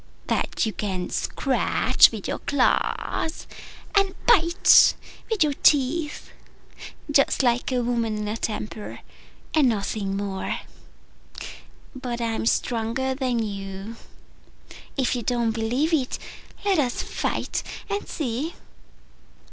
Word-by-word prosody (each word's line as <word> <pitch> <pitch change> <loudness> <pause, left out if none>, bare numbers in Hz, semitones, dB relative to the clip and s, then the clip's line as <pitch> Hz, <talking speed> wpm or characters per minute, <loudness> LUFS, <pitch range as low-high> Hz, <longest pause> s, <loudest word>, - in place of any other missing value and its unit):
That - - 0
you 220 - -2
can 190 -3 -3
scratch - - +3
with - - -6
your - - -3
claws 290 +3 0 0.5
and 395 -2 +3
bite 345 -6 +6 0.3
with 435 -7 +3
your 295 -2 +1
teeth 295 +3 +2 0.8
just 275 -1 +3
like 245 +1 +1
a 250 -1 +1
woman 230 -2 0
in 210 0 -3
a 210 - -2
temper 215 -1 -5 0.5
and 295 -5 +5
nothing 200 -2 -2
more. 195 -1 -3 1.3
But 250 -2 -4
I'm 225 -1 -1
stronger 240 +3 0
than 250 -4 -1
you: 195 +1 -6 1.0
if 260 -1 +1
you 245 - -2
don't 235 0 0
believe 240 +9 0
it, 270 -5 +1 0.5
let 390 -5 +3
us 250 -4 0
fight - - -2 0.3
and 405 0 -3
see." 290 +2 -3
245 Hz, 115 wpm, -24 LUFS, 220-290 Hz, 1.3 s, bite